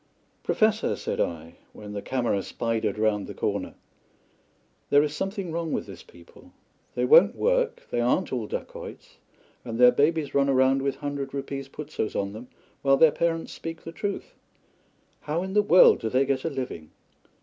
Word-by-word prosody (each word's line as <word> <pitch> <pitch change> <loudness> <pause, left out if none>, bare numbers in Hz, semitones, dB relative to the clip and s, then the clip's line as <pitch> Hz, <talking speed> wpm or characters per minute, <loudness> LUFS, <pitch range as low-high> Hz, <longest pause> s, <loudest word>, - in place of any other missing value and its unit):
"Professor," 215 0 +1
said - - -4
I, 80 -1 -4 0.2
when 105 -1 -9
the 100 - -4
camera 120 -6 -1
spidered 115 +1 -2
round 105 -2 0
the - - -8
corner, - - -3 1.1
"there 145 +1 +5
is 150 0 -3
something 195 -1 -3
wrong 165 0 -3
with - - -2
this - - -11
people. 460 0 -18 0.4
They - - +1
won't 480 +2 +6
work, - - 0
they - - 0
aren't - - +1
all - - -2
dacoits, - - -8 0.5
and 115 -2 -5
their 125 0 +7
babies 150 +3 +1
run 140 0 +2
about 135 0 +3
with 135 0 -1
hundred 140 -1 -5
rupees 135 0 -5
putsoes 145 -7 -5
on 100 0 -2
them, 115 +4 -9 0.3
while 135 0 +4
their 160 +1 +6
parents 165 0 -1
speak 165 0 -7
the 165 - -7
truth. 200 +4 -5 0.9
How 160 +4 -2
in 190 0 -5
the 210 - +5
world 185 -3 +6
do 110 - -2
they 130 +4 +2
get 135 +1 -1
a - - +1
living?" 125 - -6
140 Hz, 170 wpm, -26 LUFS, 125-185 Hz, 1.1 s, their